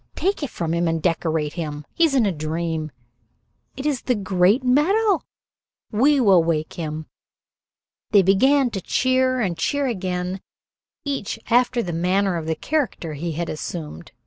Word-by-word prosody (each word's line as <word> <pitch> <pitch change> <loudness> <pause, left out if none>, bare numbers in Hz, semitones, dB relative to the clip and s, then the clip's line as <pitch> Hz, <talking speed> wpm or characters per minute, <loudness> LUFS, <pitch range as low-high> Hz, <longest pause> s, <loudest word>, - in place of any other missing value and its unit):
Take 390 0 -1
it 290 - -2
from 165 -5 -3
him 170 0 +1
and 165 0 0
decorate 160 -3 0
him. 150 -3 -5
He 335 - +4
is 295 -4 +1
in 250 -4 +4
a 200 - +2
dream. 160 0 -3 0.9
It 270 - -5
is 285 -5 0
the 250 - 0
great 195 +4 +2
medal. 380 - +3 0.7
We 275 +6 +3
will 195 -8 +5
wake 160 -2 -1
him." 155 -2 -5 1.0
They 200 -2 +5
began 255 +8 +4
to 195 - -4
cheer 255 +4 +1
and 190 -7 0
cheer 285 - 0
again, 185 -5 -3 0.6
each 275 -7 -3
after 245 0 +3
the 175 - -4
manner 185 +3 +1
of 160 -1 -5
the 160 - 0
character 245 - -2
he 165 +3 -4
had 170 +2 -3
assumed. 155 - -6
190 Hz, 160 wpm, -22 LUFS, 165-255 Hz, 1.0 s, will